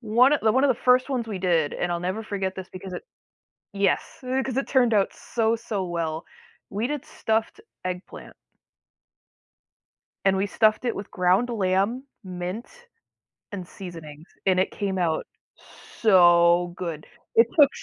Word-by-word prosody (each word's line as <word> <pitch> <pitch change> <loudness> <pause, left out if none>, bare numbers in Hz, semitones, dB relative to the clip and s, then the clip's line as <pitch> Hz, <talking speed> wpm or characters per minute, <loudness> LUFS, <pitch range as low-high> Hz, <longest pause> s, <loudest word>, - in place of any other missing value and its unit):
one 240 +4 +4
of 300 - +2
th 220 -1 +3
one 260 +3 +3
of - - +4
the 250 -3 0
1st 255 +2 +4
ones 240 -4 -2
we 200 -3 -4
did, 170 -5 +1
and 175 0 -1
I'll 170 - -2
never 185 +5 -3
forget 195 -3 -3
this 190 -1 -8
because 185 0 -8
it - - -6 0.7
yes, 200 0 0
eh, 260 +1 0
'cause 260 -1 -4
it 270 - -1
turned 245 -4 +3
out 200 -2 +2
so, 230 -1 0
so 210 -4 -3
well. 165 -2 -3 0.4
We 215 +5 -2
did 295 -2 -4
stuffed 220 - -2 0.2
eggplant. 180 0 -7 1.9
And 195 0 +3
we 195 +1 +1
stuffed 215 +3 +2
it 240 - -1
with 200 - -7
ground 185 +7 +2
lamb, 200 +4 0 0.2
mint, 180 +4 -5 0.9
and 185 -3 -6
seasonings, 165 -4 -10 0.2
and 185 -1 +3
it 185 - +2
came 195 -2 -3
out 165 -3 0 0.7
so 175 -3 +5
good. 165 -4 -5 0.3
It 230 - +6
took 285 - +9
195 Hz, 160 wpm, -25 LUFS, 180-230 Hz, 1.9 s, took